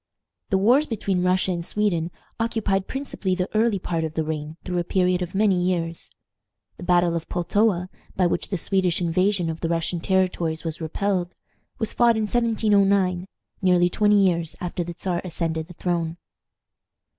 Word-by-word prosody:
The 190 Hz, -, +3 dB
wars 250 Hz, +10 st, +4 dB
between 195 Hz, -5 st, -1 dB
Russia 185 Hz, +1 st, +2 dB
and 170 Hz, -1 st, -2 dB
Sweden 175 Hz, -4 st, 0 dB, 0.3 s
occupied 220 Hz, -4 st, 0 dB
principally 265 Hz, -9 st, -2 dB
the 180 Hz, 0 st, -1 dB
early 220 Hz, -1 st, +3 dB
part 170 Hz, -3 st, -2 dB
of 160 Hz, -1 st, -4 dB
the 160 Hz, -, 0 dB
reign 155 Hz, 0 st, -4 dB
through 180 Hz, -1 st, -2 dB
a -, -, 0 dB
period 180 Hz, 0 st, +1 dB
of 180 Hz, +1 st, -4 dB
many 195 Hz, -3 st, +3 dB
years. 170 Hz, -2 st, -1 dB, 0.7 s
The -, -, -9 dB
battle 175 Hz, -1 st, +3 dB
of 165 Hz, -1 st, -4 dB
Pultowa, 180 Hz, +1 st, +1 dB, 0.3 s
by 185 Hz, -, +2 dB
which 175 Hz, -, -1 dB
the 195 Hz, -, -1 dB
Swedish 185 Hz, -1 st, +1 dB
invasion 185 Hz, +1 st, +1 dB
of 160 Hz, 0 st, -4 dB
the 165 Hz, -, -1 dB
Russian 170 Hz, +1 st, -1 dB
territories 180 Hz, -3 st, 0 dB
was 165 Hz, 0 st, -4 dB
repelled, 180 Hz, +2 st, -1 dB, 0.4 s
was 220 Hz, -, -1 dB
fought 235 Hz, -2 st, +4 dB
in 220 Hz, -, 0 dB
1709, 200 Hz, -5 st, +2 dB, 0.3 s
nearly 180 Hz, -2 st, +4 dB
twenty 210 Hz, +2 st, +3 dB
years 170 Hz, -3 st, 0 dB
after 175 Hz, 0 st, -3 dB
the 170 Hz, 0 st, -7 dB
Czar 180 Hz, -2 st, -2 dB
ascended 160 Hz, -3 st, -3 dB
the 180 Hz, -, -12 dB
throne. 170 Hz, -2 st, -2 dB
180 Hz, 170 wpm, -24 LUFS, 170-200 Hz, 0.7 s, wars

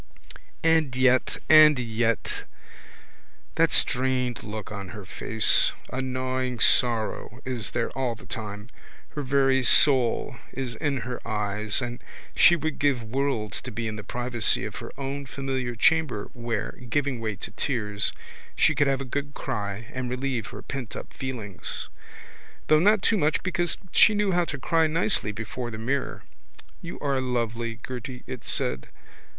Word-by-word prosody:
And 160 Hz, -5 st, +3 dB
yet 130 Hz, 0 st, +3 dB
and 155 Hz, -2 st, +8 dB
yet! 115 Hz, -2 st, -1 dB, 1.1 s
That -, -, +3 dB
strained 125 Hz, -1 st, +1 dB
look 105 Hz, -1 st, -6 dB
on 100 Hz, -2 st, -6 dB
her 100 Hz, -, -9 dB
face! 110 Hz, +3 st, +3 dB, 0.2 s
A 130 Hz, -, -1 dB
gnawing 130 Hz, -1 st, -2 dB
sorrow 115 Hz, 0 st, +2 dB
is 125 Hz, -5 st, -2 dB
there 115 Hz, -, -2 dB
all 130 Hz, -3 st, -2 dB
the -, -, -15 dB
time. 105 Hz, 0 st, -6 dB, 0.4 s
Her 150 Hz, -, -5 dB
very 135 Hz, -1 st, +3 dB
soul 130 Hz, -2 st, +5 dB, 0.2 s
is 130 Hz, -2 st, -4 dB
in 140 Hz, -1 st, -1 dB
her 125 Hz, 0 st, -5 dB
eyes 105 Hz, +1 st, -1 dB
and 120 Hz, +1 st, -6 dB, 0.3 s
she 175 Hz, -, +7 dB
would 160 Hz, -3 st, -3 dB
give 140 Hz, -4 st, +1 dB
worlds 115 Hz, -3 st, -2 dB
to 125 Hz, -, -7 dB
be 115 Hz, +1 st, -3 dB
in 110 Hz, -, -4 dB
the 105 Hz, -, -7 dB
privacy 120 Hz, 0 st, 0 dB
of -, -, -6 dB
her -, -, -7 dB
own 140 Hz, 0 st, -4 dB
familiar 130 Hz, -2 st, -3 dB
chamber 150 Hz, -4 st, +2 dB
where, 120 Hz, -3 st, -3 dB, 0.2 s
giving 140 Hz, -2 st, 0 dB
way 110 Hz, -2 st, -3 dB
to -, -, -8 dB
tears, 105 Hz, -3 st, -1 dB, 0.4 s
she -, -, +4 dB
could 145 Hz, -, +2 dB
have 135 Hz, -1 st, +1 dB
a -, -, -4 dB
good 145 Hz, +3 st, -4 dB
cry 105 Hz, -4 st, -4 dB
and 130 Hz, -1 st, -3 dB
relieve 125 Hz, -4 st, -2 dB
her -, -, -9 dB
pentup 130 Hz, -5 st, -6 dB
feelings 115 Hz, -8 st, -6 dB, 0.8 s
though 155 Hz, -, +6 dB
not 205 Hz, +3 st, +4 dB
too 225 Hz, -, +3 dB
much 155 Hz, -3 st, +1 dB
because 175 Hz, -1 st, +1 dB
she 215 Hz, -, +6 dB
knew 205 Hz, -1 st, +1 dB
how 175 Hz, -1 st, +2 dB
to 145 Hz, -, -4 dB
cry 160 Hz, +4 st, +2 dB
nicely 165 Hz, -, 0 dB
before 115 Hz, +3 st, -5 dB
the 110 Hz, -, -6 dB
mirror. 130 Hz, +5 st, -2 dB, 0.6 s
You 170 Hz, -, -7 dB
are 140 Hz, -2 st, 0 dB
lovely, 115 Hz, -2 st, -2 dB
Gerty, 125 Hz, 0 st, -6 dB
it 130 Hz, -2 st, -7 dB
said. 65 Hz, +1 st, -1 dB
125 Hz, 155 wpm, -26 LUFS, 115-140 Hz, 1.1 s, and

